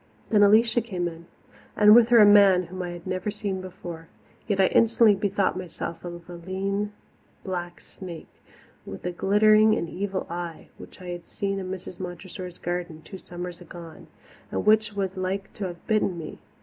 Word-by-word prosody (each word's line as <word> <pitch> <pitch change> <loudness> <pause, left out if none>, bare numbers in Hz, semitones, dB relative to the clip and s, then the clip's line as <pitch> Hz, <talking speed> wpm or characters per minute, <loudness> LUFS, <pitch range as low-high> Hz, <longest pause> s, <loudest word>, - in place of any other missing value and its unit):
Then 210 -2 +5
Alicia 220 +4 +5
came 185 -6 -3
in, 165 0 -9 0.5
and 210 0 +8
with 235 0 +7
her 240 0 +5
a 215 - +9
man 200 -3 +6
whom 185 +2 -7
I 180 - -4
had 175 -1 -9
never 185 +2 -2
before 185 -5 -6
seen. - - -32
Yet 205 -3 0
I 190 - +6
instantly 230 +1 +4
bethought 200 -1 0
myself 180 -2 -6
of 175 -1 -8
a 175 - -9
lean 195 +4 -3 0.5
black 175 -2 -5
snake, 175 -4 -11 0.4
with 95 - -9
a 180 - -1
glittering 215 +4 +4
and 170 - -2
evil 190 +2 -3
eye, 170 -1 -6
which - - -12
I 180 - -7
had 175 -1 -7
seen 195 -1 -3
in 185 -1 -5
Mrs. 185 -1 -7
Montressor's 180 0 -7
garden 175 -2 -4
two 190 +3 -10
summers 175 -1 -8
agone, 170 -1 -11 0.4
and - - -3
which 215 0 +4
was 195 -1 -2
like 190 +1 -3
to 200 - -4
have 175 -1 -10
bitten 210 -4 +1
me. 160 -2 -8
185 Hz, 180 wpm, -25 LUFS, 175-205 Hz, 0.5 s, a